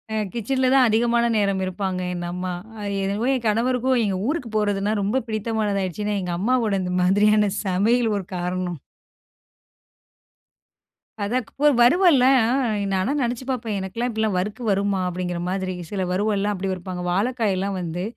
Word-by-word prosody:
அ -, -, 0 dB, 0.2 s
கிச்சன்ல 260 Hz, +3 st, 0 dB
தான் 265 Hz, -2 st, +6 dB
அதிகமான 235 Hz, +2 st, +2 dB
நேரம் 200 Hz, -2 st, +1 dB
இருப்பாங்க. 185 Hz, 0 st, -3 dB
என் 175 Hz, -1 st, -4 dB
அம்மா. 180 Hz, +1 st, -3 dB, 0.3 s
அது 200 Hz, -1 st, -3 dB
என்னவோ 200 Hz, +4 st, -1 dB
என் 255 Hz, -3 st, -2 dB
கணவருக்கும் 250 Hz, +3 st, +1 dB
எங்க 195 Hz, -2 st, -1 dB
ஊருக்கு 285 Hz, -5 st, -2 dB
போறதுன்னா 205 Hz, -1 st, 0 dB
ரொம்ப 210 Hz, +7 st, 0 dB
பிடித்தமானதா 215 Hz, -2 st, -1 dB
ஆயிடுச்சுன்னா, 205 Hz, +3 st, -2 dB
எங்க 180 Hz, -1 st, -3 dB
அம்மாவோட 230 Hz, 0 st, +1 dB
இந்த 180 Hz, 0 st, -3 dB
மாதிரியான 210 Hz, +2 st, +3 dB
சமையல் 215 Hz, +5 st, +2 dB
ஒரு 195 Hz, -, -5 dB
காரணம். 180 Hz, -1 st, -3 dB, 2.5 s
அதான் 245 Hz, +4 st, -1 dB
க் -, -, -22 dB
ப 295 Hz, -, +4 dB, 0.2 s
வறுவல்ல. 310 Hz, 0 st, +5 dB, 0.2 s
ஆ -, -, 0 dB, 0.5 s
நானா 190 Hz, +8 st, 0 dB
நெனச்சு 245 Hz, 0 st, -2 dB
பார்ப்பேன். 230 Hz, -5 st, -2 dB
எனக்குலாம் 210 Hz, +6 st, -3 dB
இப்பிடிலாம் 220 Hz, -2 st, -1 dB
வறுக்கு 210 Hz, +6 st, -3 dB
வருமா! 200 Hz, 0 st, +1 dB
அப்பிடிங்கிற 180 Hz, -1 st, -3 dB
மாதிரி. 185 Hz, -1 st, -2 dB, 0.2 s
சில 200 Hz, -2 st, -2 dB
வறுவல்லாம் 205 Hz, +2 st, 0 dB
அப்பிடி 195 Hz, -1 st, -3 dB
வருப்பாங்க. 180 Hz, 0 st, -5 dB
வாழைக்காய்லாம் 200 Hz, -2 st, 0 dB
வந்து 175 Hz, 0 st, -4 dB
205 Hz, 150 wpm, -23 LUFS, 185-235 Hz, 2.5 s, தான்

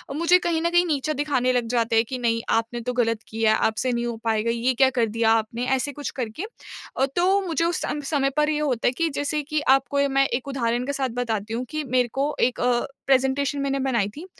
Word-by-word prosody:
मुझे 340 Hz, +3 st, +4 dB
कहीं 335 Hz, -2 st, -1 dB
न 340 Hz, -, +1 dB
कहीं 345 Hz, +1 st, +3 dB
नीचा 305 Hz, -2 st, -1 dB
दिखाने 275 Hz, -4 st, 0 dB
लग 245 Hz, -2 st, 0 dB
जाते 230 Hz, -2 st, +1 dB
हैं 225 Hz, +1 st, +4 dB
कि 260 Hz, -, -3 dB
नहीं 230 Hz, -2 st, 0 dB
आपने 230 Hz, +1 st, 0 dB
तो 250 Hz, +2 st, -3 dB
ग़लत 230 Hz, -2 st, 0 dB
किया 220 Hz, 0 st, +1 dB
है, -, -, +2 dB
आपसे 220 Hz, +3 st, 0 dB
नहीं 240 Hz, 0 st, -1 dB
हो 235 Hz, -1 st, -3 dB
पाएगा, 225 Hz, 0 st, +1 dB
ये 235 Hz, +2 st, 0 dB
क्या 260 Hz, +2 st, +4 dB
कर 250 Hz, -3 st, +1 dB
दिया 225 Hz, +1 st, +1 dB
आपने 225 Hz, +2 st, 0 dB
ऐसे 265 Hz, +2 st, -2 dB
कुछ 290 Hz, +1 st, -5 dB
करके। 235 Hz, -, -4 dB, 0.5 s
अ, 265 Hz, -, +3 dB
तो 380 Hz, +3 st, +3 dB
मुझे 335 Hz, 0 st, 0 dB
उस 345 Hz, 0 st, 0 dB
सम 295 Hz, -, -3 dB
समय 275 Hz, -3 st, +2 dB
पर 300 Hz, 0 st, +3 dB
ये 300 Hz, -1 st, 0 dB
होता 265 Hz, -6 st, 0 dB
है -, -, +4 dB
कि 330 Hz, -1 st, +1 dB
जैसे 295 Hz, +1 st, -1 dB
कि 305 Hz, +1 st, -2 dB, 0.2 s
आपको 280 Hz, +1 st, -1 dB
मैं 275 Hz, 0 st, +3 dB
एक 245 Hz, +2 st, -3 dB
उदाहरण 245 Hz, -3 st, -1 dB
के 285 Hz, -, -2 dB
साथ 270 Hz, -2 st, -1 dB
बताती 225 Hz, -3 st, -2 dB
हूँ, 245 Hz, +2 st, -2 dB
कि 310 Hz, 0 st, -3 dB
मेरे 255 Hz, -3 st, +1 dB
को 290 Hz, +2 st, 0 dB
एक 250 Hz, -, -13 dB
अ, 245 Hz, -1 st, +2 dB, 0.2 s
प्रेज़ेंटेशन 270 Hz, +2 st, +2 dB
मैंने 275 Hz, 0 st, -1 dB
बनाई 245 Hz, -7 st, +1 dB
थी। 315 Hz, +5 st, -8 dB
260 Hz, 240 wpm, -24 LUFS, 235-290 Hz, 0.5 s, मुझे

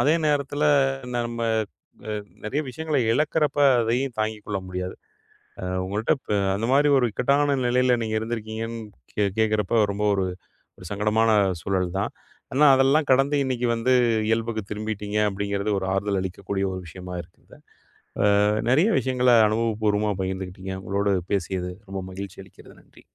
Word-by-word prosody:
அதே 155 Hz, +3 st, +4 dB
நேரத்தில 145 Hz, 0 st, 0 dB, 0.5 s
நம்ம 120 Hz, -1 st, -3 dB, 0.7 s
அ -, -, -2 dB, 0.3 s
நிறைய 110 Hz, +8 st, -1 dB
விஷயங்களை 155 Hz, +1 st, -2 dB
இழக்கிறப்ப 150 Hz, +1 st, +1 dB, 0.2 s
அதையும் 120 Hz, +3 st, 0 dB
தாங்கிக் 110 Hz, -1 st, -2 dB
கொள்ள 100 Hz, -2 st, -2 dB
முடியாது. 90 Hz, 0 st, -4 dB, 0.7 s
அ -, -, -6 dB, 0.2 s
உங்ககிட்ட 105 Hz, +4 st, -1 dB
இப்போ 105 Hz, -, -3 dB, 0.2 s
அந்த 110 Hz, +3 st, -2 dB
மாதிரி 145 Hz, +2 st, +4 dB
ஒரு 125 Hz, -, +3 dB
இக்கட்டான 140 Hz, +4 st, +2 dB
நிலையில 125 Hz, 0 st, +3 dB
நீங்க 110 Hz, 0 st, -2 dB
இருந்திருக்கீங்கன்னு 110 Hz, 0 st, -4 dB, 0.3 s
கே 105 Hz, -, +1 dB
கேட்கிறப்போ, 110 Hz, +1 st, +1 dB
ரொம்ப 100 Hz, +1 st, -3 dB
ஒரு 95 Hz, -, 0 dB, 0.7 s
சங்கடமான 105 Hz, +2 st, +2 dB, 0.3 s
சூழல் 95 Hz, -2 st, -1 dB
தான். 100 Hz, -, -2 dB, 0.4 s
ஆனா 150 Hz, +3 st, +5 dB
அதெல்லாம் 135 Hz, +3 st, +3 dB
கடந்து, 135 Hz, +3 st, +3 dB
இன்னைக்கு 125 Hz, -2 st, -1 dB
வந்து 120 Hz, +3 st, +1 dB, 0.4 s
இயல்புக்கு 115 Hz, -1 st, -1 dB
திரும்பிட்டீங்க, 105 Hz, 0 st, -3 dB
அப்படிங்கிறது 100 Hz, +1 st, -2 dB
ஒரு 95 Hz, -, -4 dB
ஆறுதல் 100 Hz, 0 st, 0 dB
அளிக்கக்கூடிய 95 Hz, +1 st, -3 dB
ஒரு 95 Hz, -, -4 dB
விஷயமா 90 Hz, +2 st, -8 dB
இருக்குது. 85 Hz, -, -20 dB, 0.7 s
ஆ -, -, +3 dB, 0.5 s
நெறைய 165 Hz, -, +4 dB
விஷயங்கள 125 Hz, -1 st, +1 dB, 0.2 s
அனுபவப்பூர்வமா 105 Hz, -2 st, 0 dB
பகிர்ந்துகிட்டீங்க. 95 Hz, 0 st, -5 dB
உங்களோடு 100 Hz, +1 st, 0 dB, 0.2 s
பேசியது 90 Hz, -1 st, -2 dB, 0.2 s
ரொம்ப 95 Hz, -1 st, -4 dB
மகிழ்ச்சி 100 Hz, 0 st, -7 dB
அளிக்கிறது. -, -, -17 dB
நன்றி! -, -, -21 dB
110 Hz, 135 wpm, -24 LUFS, 100-125 Hz, 0.7 s, ஆனா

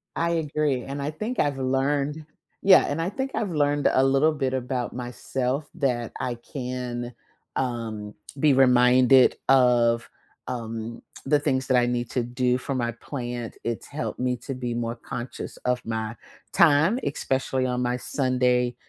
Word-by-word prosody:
I 170 Hz, +1 st, 0 dB
agree, 150 Hz, -5 st, 0 dB
and 140 Hz, +1 st, -5 dB
I 145 Hz, +2 st, -2 dB
think 215 Hz, +11 st, -4 dB
I've 145 Hz, -2 st, +1 dB
learned 140 Hz, +3 st, 0 dB, 0.4 s
Yeah, 195 Hz, -1 st, +7 dB
and 155 Hz, +3 st, -1 dB
I 175 Hz, -, -1 dB
think 265 Hz, +5 st, -3 dB
I've 205 Hz, -5 st, -1 dB
learned 145 Hz, -1 st, +2 dB
a 130 Hz, -, +3 dB
little 135 Hz, +4 st, +3 dB
bit 135 Hz, -3 st, -1 dB
about 125 Hz, -1 st, -2 dB
myself 125 Hz, +3 st, -3 dB
that 125 Hz, -7 st, -1 dB
I 125 Hz, -1 st, -2 dB
can, 125 Hz, -1 st, -5 dB, 0.4 s
um, 115 Hz, -5 st, -3 dB, 0.2 s
be 150 Hz, +1 st, +4 dB
reminded 125 Hz, 0 st, +5 dB
of, 120 Hz, -3 st, +4 dB, 0.4 s
um, 115 Hz, -1 st, -5 dB, 0.2 s
the 145 Hz, +2 st, +3 dB
things 130 Hz, -3 st, 0 dB
that 130 Hz, -2 st, +3 dB
I 120 Hz, -, +4 dB
need 120 Hz, -1 st, -1 dB
to 125 Hz, -, 0 dB
do 125 Hz, +1 st, 0 dB
for 135 Hz, +1 st, -4 dB
my 120 Hz, -2 st, 0 dB
plant, 120 Hz, -1 st, -6 dB
it's 115 Hz, -1 st, -3 dB
helped 150 Hz, -2 st, -5 dB
me 125 Hz, 0 st, 0 dB
to 135 Hz, -, -3 dB
be 125 Hz, -2 st, -3 dB
more 120 Hz, 0 st, -2 dB
conscious 120 Hz, +1 st, -6 dB
of 125 Hz, 0 st, 0 dB
my 110 Hz, 0 st, -3 dB, 0.3 s
time, 170 Hz, -, +4 dB
especially 130 Hz, -1 st, -1 dB
on 125 Hz, 0 st, -1 dB
my 125 Hz, 0 st, 0 dB
Sunday 125 Hz, -2 st, +1 dB
130 Hz, 160 wpm, -25 LUFS, 120-145 Hz, 0.4 s, Yeah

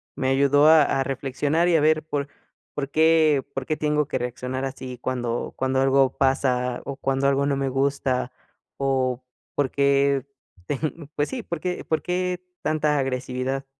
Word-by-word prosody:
me 130 Hz, -, -1 dB
ayudó 140 Hz, +2 st, +4 dB
a 160 Hz, 0 st, +8 dB
a 135 Hz, -1 st, +1 dB
reflexionar 140 Hz, +5 st, 0 dB
y 175 Hz, -, +3 dB
a 160 Hz, -, +4 dB
ver 155 Hz, +1 st, +2 dB
por 145 Hz, -2 st, -2 dB, 0.4 s
por 140 Hz, -1 st, -3 dB
qué 155 Hz, -2 st, +4 dB
por 135 Hz, -1 st, -4 dB
qué 155 Hz, -, -1 dB
tengo 150 Hz, -1 st, 0 dB
que -, -, -2 dB
reaccionar 125 Hz, +2 st, -4 dB
así 130 Hz, -2 st, -6 dB
cuando 120 Hz, -2 st, -3 dB
cuando 130 Hz, 0 st, +1 dB
algo 135 Hz, -1 st, +3 dB
pasa 130 Hz, -2 st, +1 dB
o 140 Hz, -, -4 dB
cuando 135 Hz, 0 st, 0 dB
algo 140 Hz, 0 st, +2 dB
no 140 Hz, -1 st, 0 dB
me 135 Hz, 0 st, -1 dB
gusta 135 Hz, -1 st, 0 dB, 0.5 s
o 130 Hz, -2 st, 0 dB, 0.3 s
por 140 Hz, -3 st, 0 dB
qué 140 Hz, 0 st, +2 dB, 0.4 s
ten 150 Hz, +1 st, -4 dB
pues 145 Hz, -, +1 dB
sí 255 Hz, -3 st, -5 dB
por 170 Hz, -4 st, -4 dB
qué 180 Hz, +2 st, -3 dB
por 160 Hz, -, -1 dB
qué 180 Hz, 0 st, -1 dB, 0.2 s
tanta 155 Hz, -1 st, +1 dB
agresividad. 130 Hz, 0 st, -2 dB
140 Hz, 170 wpm, -24 LUFS, 130-150 Hz, 0.5 s, a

